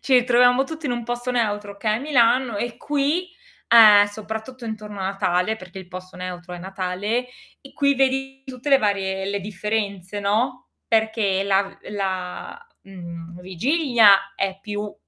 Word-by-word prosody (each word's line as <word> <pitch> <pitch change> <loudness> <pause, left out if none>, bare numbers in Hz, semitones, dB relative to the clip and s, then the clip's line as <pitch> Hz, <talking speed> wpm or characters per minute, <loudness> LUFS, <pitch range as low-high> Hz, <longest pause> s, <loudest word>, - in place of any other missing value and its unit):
ci 270 - -3
ritroviamo 245 +1 +4
tutti 320 +1 -6
in 245 - 0
un 240 -1 -4
posto 240 +1 -3
neutro 205 -4 -1
che 220 - -2
è 215 +1 +2
Milano 250 -4 +2
e 235 +2 -3
qui, 295 +5 -1 0.4
ehm, 215 -3 +8
soprattutto 220 +4 -7
intorno 210 -2 -7
a - - -2
Natale, 190 +1 0
perché 185 -1 -11
il 185 - -11
posto 185 0 -10
neutro 180 -1 -7
è - - -8
Natale, 195 +6 -3 0.4
e 275 - -14
qui 280 -1 +2
vedi 270 0 0
tutte 260 0 -7
le 275 - +7
varie 195 -3 -1
le 200 0 -2
differenze, 205 -1 -3
no, 230 +5 -1 0.2
perché 220 -3 +1
la 195 0 0
la, 190 - -4 0.2
mhmm, 170 -2 -10
vigilia 200 - +3
è 195 -1 -2
più, 205 0 -5
210 Hz, 155 wpm, -22 LUFS, 195-245 Hz, 0.4 s, ehm